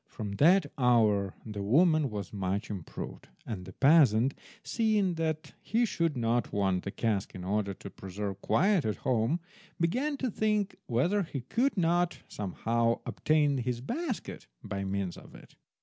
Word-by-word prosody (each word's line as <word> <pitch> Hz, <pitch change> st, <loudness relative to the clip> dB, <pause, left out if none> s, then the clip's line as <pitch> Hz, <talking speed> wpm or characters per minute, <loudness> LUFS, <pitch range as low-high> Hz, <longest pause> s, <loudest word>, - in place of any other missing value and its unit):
From 105 Hz, -2 st, -6 dB
that 175 Hz, -, +5 dB
hour 110 Hz, -6 st, +3 dB
the 105 Hz, -2 st, -5 dB
woman 155 Hz, -, +4 dB
was 105 Hz, -1 st, -6 dB
much 100 Hz, +2 st, -2 dB
improved, 95 Hz, -6 st, -7 dB, 0.2 s
and 95 Hz, -5 st, -5 dB
the 95 Hz, -, -9 dB
peasant, 135 Hz, -, +5 dB, 0.3 s
seeing 215 Hz, -5 st, +1 dB
that 160 Hz, -1 st, -2 dB
he 235 Hz, +2 st, +1 dB
should 165 Hz, -, -1 dB
not 120 Hz, 0 st, 0 dB
want 95 Hz, -3 st, +1 dB
the -, -, -2 dB
cask 105 Hz, -2 st, -1 dB
in 90 Hz, -, -7 dB
order 100 Hz, +1 st, -1 dB
to 100 Hz, -, -9 dB
preserve 100 Hz, +1 st, -6 dB
quiet 195 Hz, -4 st, +3 dB
at 110 Hz, -, -1 dB
home, 125 Hz, +6 st, +2 dB, 0.4 s
began 260 Hz, -, 0 dB
to 260 Hz, -3 st, -2 dB
think 210 Hz, -1 st, 0 dB
whether 170 Hz, -, +2 dB
he 150 Hz, -7 st, -4 dB
could 235 Hz, -, 0 dB
not 175 Hz, 0 st, +2 dB
somehow 115 Hz, +4 st, -1 dB
obtain 150 Hz, -3 st, +2 dB
his 125 Hz, -1 st, -2 dB
basket 250 Hz, -, -4 dB, 0.2 s
by 100 Hz, -1 st, -4 dB
means 95 Hz, -2 st, -2 dB
of -, -, -14 dB
it. -, -, -15 dB
125 Hz, 155 wpm, -30 LUFS, -, 0.4 s, that